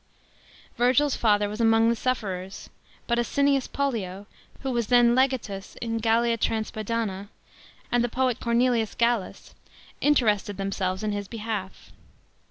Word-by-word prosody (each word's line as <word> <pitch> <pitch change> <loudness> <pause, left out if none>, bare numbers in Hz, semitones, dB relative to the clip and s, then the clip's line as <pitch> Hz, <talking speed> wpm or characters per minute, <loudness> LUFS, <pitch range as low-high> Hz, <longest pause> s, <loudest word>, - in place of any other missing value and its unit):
Virgil's 255 +4 +3
father 210 -2 +2
was 210 +3 -5
among 225 0 +4
the 235 - +2
sufferers; 195 -7 -4 0.3
but 235 -1 0
Asinius 275 +2 +1
Pollio, 205 -9 -3 0.4
who 270 - -2
was 235 -3 -1
then 240 0 +5
legatus 250 -7 -1
in 230 -1 -3
Gallia 230 +1 +2
Transpada.ua, 215 -2 -2 0.6
and 245 0 +3
the 240 - 0
poet 255 -1 0
Cornelius 235 -2 +1
G 235 - +3
allus, 235 -5 -3 0.5
interested 210 -8 +2
themselves 195 -1 -2
in 215 - -1
his 205 -1 -4
beh; 225 0 -7
df. 200 -4 -5
230 Hz, 135 wpm, -26 LUFS, 205-245 Hz, 0.6 s, then